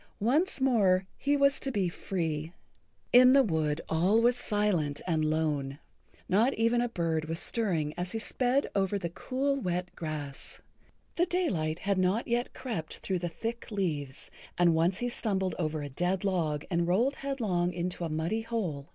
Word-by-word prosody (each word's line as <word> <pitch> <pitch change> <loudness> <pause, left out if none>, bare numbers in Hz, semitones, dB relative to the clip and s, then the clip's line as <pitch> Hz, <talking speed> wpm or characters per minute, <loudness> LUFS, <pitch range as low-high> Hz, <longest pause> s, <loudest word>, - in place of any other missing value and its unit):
Once 285 - +2
more 200 -8 +3
he 285 +1 +1
was 280 0 +3
to 270 - -3
be 200 -6 0
free. 165 -3 -3 0.6
In 250 +1 +8
the 275 0 +6
wood 160 - 0
all 180 +7 +3
was 240 +1 +4
silent 205 -11 0
and 160 -3 +1
lone. 150 -3 0 0.5
Not 225 +8 +3
even 230 +2 +2
a 245 - 0
bird 165 -6 -1
was 165 +1 -2
stirring 175 -12 0
as 180 +1 -2
he - - -1
sped 250 +4 +1
over 195 0 +1
the 170 -3 -4
cool, 275 +8 -1
wet 180 -1 -3
grass. 150 -4 -6 0.6
The 350 +2 +3
daylight 180 - 0
had 195 +1 0
not 185 +5 +1
yet 240 +1 0
crept 210 -12 -4
through 185 -2 -2
the 175 0 -3
thick 230 +7 -5
leaves, 155 - -3 0.3
and 175 -1 +4
once 170 +3 +2
he 245 - -1
stumbled 195 -6 -1
over 155 -2 -1
a 145 - -5
dead 180 +7 -1
log 165 -7 0
and 170 -1 +1
rolled 235 +10 +2
headlong 215 -11 -1
into 175 0 -3
a 165 - -2
muddy 160 +8 -1
hole. 185 -12 -3
185 Hz, 170 wpm, -29 LUFS, 160-235 Hz, 0.6 s, In